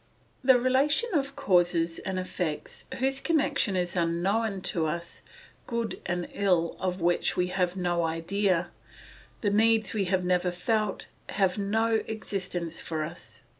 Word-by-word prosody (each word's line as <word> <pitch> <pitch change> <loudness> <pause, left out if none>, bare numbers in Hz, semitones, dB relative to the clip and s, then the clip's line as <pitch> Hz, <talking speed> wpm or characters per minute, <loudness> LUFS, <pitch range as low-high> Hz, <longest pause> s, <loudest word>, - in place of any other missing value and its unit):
The 260 -1 +7
relation 280 - +2
of 275 -3 0
causes 175 - +2
and 190 -1 -3
effects 175 -4 -4
whose 270 +2 0
connection 280 - +1
is 180 -1 -1
unknown 190 +5 0
to 160 -2 +1
us, 170 +2 -5 0.5
good 235 -2 -3
and 175 -1 -1
ill 180 -4 +1
of 185 -1 -2
which 175 +1 +1
we 180 0 +1
have 180 -1 0
no 175 -1 +1
idea, 175 +2 0 0.7
the 205 - +1
needs 220 -2 +3
we 205 -3 0
have 185 0 +1
never 180 0 +2
felt, 205 +3 -1 0.2
have 195 0 +1
no 220 +2 +1
existence 185 -6 -3
for 160 -1 -3
us. 170 +3 -9
185 Hz, 140 wpm, -28 LUFS, 175-225 Hz, 0.7 s, The